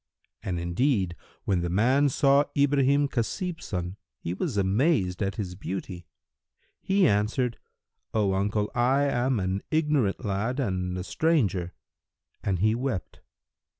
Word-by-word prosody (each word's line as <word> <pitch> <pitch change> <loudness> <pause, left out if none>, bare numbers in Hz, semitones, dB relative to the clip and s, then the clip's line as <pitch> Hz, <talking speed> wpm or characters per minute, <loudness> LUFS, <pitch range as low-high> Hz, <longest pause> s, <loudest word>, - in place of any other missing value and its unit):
And 90 -2 -3
indeed, 90 +1 0 0.3
when 95 -3 +1
the 85 - -2
man 130 +10 +3
saw 140 +2 +4
Ibrahim 140 0 +3
Khasib 165 - -2
son, 90 0 -4 0.2
he 85 - -4
was 100 - -3
amazed 100 - +1
at 100 -1 -1
his 95 -5 -4
beauty. 90 -1 -6 0.7
He 195 -2 +3
answered, 110 +4 0 0.5
"O 105 -3 +1
uncle, 105 +2 0
I 130 +4 +3
am 130 -3 +1
an 95 +1 -1
ignorant 150 -12 +1
lad 105 +7 -1
and 90 -6 -1
a 90 - -3
stranger," 95 - 0 0.7
and 95 -2 0
he 110 +5 +2
wept. 120 -6 -3
105 Hz, 130 wpm, -27 LUFS, 95-135 Hz, 0.7 s, saw